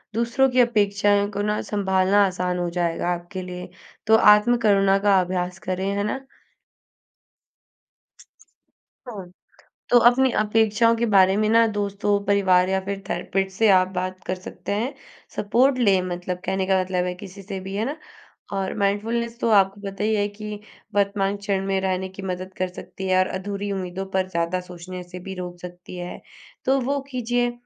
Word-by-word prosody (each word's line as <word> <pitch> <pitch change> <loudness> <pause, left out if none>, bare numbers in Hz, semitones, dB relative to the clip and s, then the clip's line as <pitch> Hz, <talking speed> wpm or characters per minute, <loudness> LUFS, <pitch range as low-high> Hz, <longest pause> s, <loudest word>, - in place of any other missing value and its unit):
दूसरों 235 +3 +2
की 255 - +2
अपेक्षाएँ 205 -3 +2
को 205 - -3
ना, 210 0 0
संभालना 195 0 +2
आसान 180 -1 -2
हो 175 -1 -1
जाएगा 175 0 -1
आपके 175 +2 -6
लिए। 180 0 -7 0.4
तो 220 - +6 0.2
आत्म 240 +3 +2
करुणा 195 -1 +4
का 195 -2 +6
अभ्यास 180 0 -3
करें। 185 +1 -1
है 200 - 0
ना? 240 +5 -2 2.9
हाँ। 195 -6 -8 0.6
तो 245 - +6
अपनी 260 +1 +2
अपेक्षाओं 225 +2 +3
के 235 +1 0
बारे 195 -2 +5
में 215 0 +2
ना 230 +1 +5
दोस्तों, 205 -1 0
परिवार 190 -2 +3
या 190 0 +1
फिर 200 0 -4
थेरेपिस्ट 195 0 -1
से 220 -2 +4
आप 185 -1 +5
बात 185 0 -3
कर 185 - -1
सकते 185 +2 -8
हैं। 240 +7 -1 0.4
सपोर्ट 255 +6 +2
लें 195 -5 +4
मतलब, 180 0 -4
कहने 190 0 0
का 190 -1 +3
मतलब 180 -1 -1
है, 180 - -2
किसी 195 +1 -10
से 195 0 -6
भी, 195 +1 -7
है 215 +3 -1
ना? 290 +3 -3 0.6
और 195 -1 -2
माइंडफुलनेस 230 +4 -1
तो 230 - 0
आपको 200 -1 +3
पता 195 0 -5
ही 220 0 +2
है 205 0 +1
कि 210 0 -7 0.4
वर्तमान 200 0 +1
क्षण 200 -1 -2
में 195 -1 0
रहने 190 0 -1
की 190 +1 -10
मदद 185 0 -5
कर 185 - 0
सकती 190 +1 -8
है 185 0 +3
और 185 - +3
अधूरी 200 +1 -4
उम्मीदों 190 0 -4
पर 185 0 +1
ज़्यादा 170 +1 -1
सोचने 180 0 -9
से 180 +1 -10
भी 190 +2 -7
रोक 180 -1 -7
सकती 180 0 -10
है। 175 0 -7 0.4
तो 270 +1 +3
वो 280 +3 0
कीजिए, 245 0 0
195 Hz, 175 wpm, -23 LUFS, 185-210 Hz, 2.9 s, तो